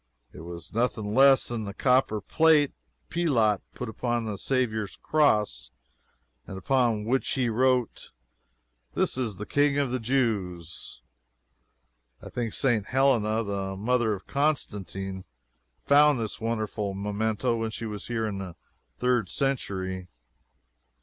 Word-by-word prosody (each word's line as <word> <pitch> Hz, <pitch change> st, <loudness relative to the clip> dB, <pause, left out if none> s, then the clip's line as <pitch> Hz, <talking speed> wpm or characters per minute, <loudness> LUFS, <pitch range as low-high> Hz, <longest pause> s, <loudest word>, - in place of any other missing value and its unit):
It -, -, -11 dB
was 85 Hz, 0 st, -9 dB
nothing 110 Hz, -2 st, -1 dB
less 135 Hz, +1 st, +6 dB
than 115 Hz, -3 st, -3 dB
the 100 Hz, 0 st, -7 dB
copper 125 Hz, -4 st, +2 dB
plate 155 Hz, -, +3 dB, 0.4 s
Pilate 120 Hz, -, +2 dB, 0.2 s
put 125 Hz, -, -5 dB
upon 120 Hz, +1 st, -2 dB
the 105 Hz, -2 st, -3 dB
Saviour's 110 Hz, -6 st, -1 dB
cross, 105 Hz, -, +1 dB, 0.8 s
and 95 Hz, -, -7 dB
upon 115 Hz, -1 st, +1 dB
which 130 Hz, +4 st, 0 dB
he 125 Hz, -3 st, +1 dB
wrote, 125 Hz, +1 st, +1 dB, 0.9 s
"THIS -, -, +1 dB
IS 115 Hz, -7 st, -2 dB
THE 105 Hz, -, -5 dB
KING 145 Hz, +2 st, +2 dB
OF 140 Hz, -3 st, +1 dB
THE 130 Hz, -, -1 dB
JEWS." 100 Hz, -, -2 dB, 1.2 s
I -, -, -11 dB
think 115 Hz, -3 st, -3 dB
St. 115 Hz, -7 st, +1 dB
Helena, 115 Hz, -5 st, +2 dB
the 100 Hz, -2 st, -3 dB
mother 115 Hz, 0 st, +1 dB
of 95 Hz, -, -12 dB
Constantine, 95 Hz, -, -2 dB, 0.6 s
found 145 Hz, -1 st, +5 dB
this 110 Hz, 0 st, -4 dB
wonderful 110 Hz, -3 st, -2 dB
memento 105 Hz, +4 st, -1 dB
when 115 Hz, 0 st, -2 dB
she 115 Hz, +1 st, -6 dB
was 105 Hz, -2 st, -6 dB
here 115 Hz, -2 st, -1 dB
in 100 Hz, -3 st, -3 dB
the 90 Hz, -3 st, -7 dB, 0.4 s
third 125 Hz, -6 st, +1 dB
century. 95 Hz, -8 st, -2 dB
115 Hz, 130 wpm, -27 LUFS, 100-130 Hz, 1.2 s, less